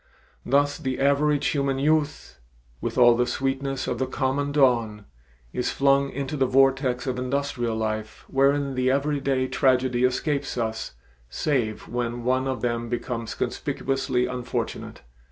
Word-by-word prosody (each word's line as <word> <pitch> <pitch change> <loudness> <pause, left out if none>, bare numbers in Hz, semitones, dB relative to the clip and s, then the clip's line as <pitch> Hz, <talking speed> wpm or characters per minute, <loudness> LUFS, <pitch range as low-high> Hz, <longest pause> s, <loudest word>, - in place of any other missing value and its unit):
Thus 145 +2 +2
the 130 -1 -3
average 140 +1 +2
human 140 -2 0
youth, 150 - 0 0.4
"With - - -3
all 120 -1 +7
the 120 +1 +1
sweetness 135 +1 -2
of 120 - -3
the 130 - 0
common 140 +2 -1
dawn," 120 -7 +2 0.5
is 125 - -1
flung 140 0 +3
into 140 +2 -4
the 135 -2 +2
vortex 135 -1 +2
of 130 -1 -2
industrial 125 -3 -1
life 110 -1 -4
wherein 140 0 +2
the 130 0 +1
everyday 140 -1 0
tragedy 130 -2 +2
escapes 135 +2 0
us 110 -1 -3 0.4
save 120 - -1
when 120 0 -3
one 130 +2 +1
of 130 -1 -2
them 120 -1 -1
becomes 120 -1 -3
conspicuously 130 -2 -1
unfortunate. 125 -1 -4
130 Hz, 135 wpm, -25 LUFS, 120-140 Hz, 0.5 s, all